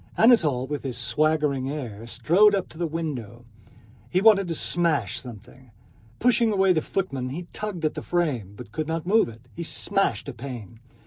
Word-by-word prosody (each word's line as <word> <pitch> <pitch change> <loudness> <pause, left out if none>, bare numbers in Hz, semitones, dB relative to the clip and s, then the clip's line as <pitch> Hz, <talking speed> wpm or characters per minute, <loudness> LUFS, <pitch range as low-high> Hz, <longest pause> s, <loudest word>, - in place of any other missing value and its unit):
Anatole 160 - +4
with 145 +1 -4
his 130 -3 -4
swaggering 150 +1 +1
air 115 -7 -6
strode 200 - +4
up 195 - -2
to - - -14
the 170 - 0
window. 130 -8 -5 0.6
He 180 - +2
wanted 200 -2 +5
to 165 - -2
smash 150 - +1
something. 125 +1 -12 0.5
Pushing 235 -2 +3
away 190 -2 +4
the 160 - +1
footmen 135 -11 -3
he 170 +7 -5
tugged 205 -6 -4
at 155 - +1
the - - -5
frame, 140 - -1
but 100 - -11
could 155 +7 -3
not 165 0 -2
move 215 - +3
it. 115 +1 -14
He 170 - -7
smashed 195 +3 -1
a 140 - -5
pane. 120 -3 -8
155 Hz, 180 wpm, -25 LUFS, 125-180 Hz, 0.6 s, wanted